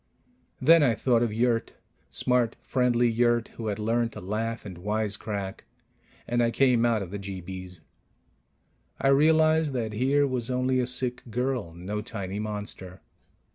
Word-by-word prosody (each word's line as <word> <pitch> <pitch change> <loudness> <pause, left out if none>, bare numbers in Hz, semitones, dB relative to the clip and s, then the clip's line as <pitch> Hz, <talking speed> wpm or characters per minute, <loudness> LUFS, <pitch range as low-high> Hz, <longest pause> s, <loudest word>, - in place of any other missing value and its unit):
Then 165 +5 +6
I 125 -6 +3
thought 120 -2 +2
of 120 -2 +1
Yurt 115 +1 0 0.4
smart, 125 -2 +1
friendly 125 -2 +2
Yurt, 120 0 +2
who 115 - -7
had 105 - -1
learned 115 +2 0
to - - -7
laugh 110 +5 -3
and 90 -4 -8
wisecrack 105 -1 -3 0.6
and 120 0 +1
I 120 - +3
came 120 -1 +3
out 110 -3 +1
of 90 - -9
the 100 - -4
jeebies. 95 -2 -7 1.2
I 135 - +2
realized 155 +1 +4
that 115 -4 -2
here 135 +6 +2
was 125 -3 -2
only 130 0 +1
a 125 - 0
sick 125 0 -1
girl, 125 -7 -2
no 100 +5 -4
tiny 100 -2 -5
monster. 105 -3 -6
115 Hz, 150 wpm, -27 LUFS, 105-125 Hz, 1.2 s, Then